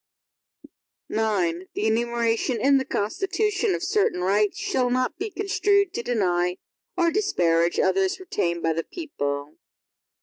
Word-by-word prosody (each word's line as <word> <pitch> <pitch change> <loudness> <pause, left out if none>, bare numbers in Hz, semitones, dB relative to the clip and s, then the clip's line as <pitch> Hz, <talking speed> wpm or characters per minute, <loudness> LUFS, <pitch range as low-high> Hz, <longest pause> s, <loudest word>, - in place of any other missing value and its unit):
IX 190 -5 0
The - - -1
enumeration 235 +1 0
in 275 +3 +4
the 265 - -3
Constitution, 390 - 0
of - - -5
certain 400 - +1
rights, 200 +3 +1
shall 370 -12 0
not 255 +3 0
be 420 +3 -2
construed 400 -1 +1
to - - -2
deny 180 -7 0 0.4
or 340 -2 +3
disparage 175 - +1
others 190 - +1
retained 170 - -2
by 165 - +2
the 165 +1 -2
people. 145 - -5
230 Hz, 130 wpm, -24 LUFS, -, 0.4 s, in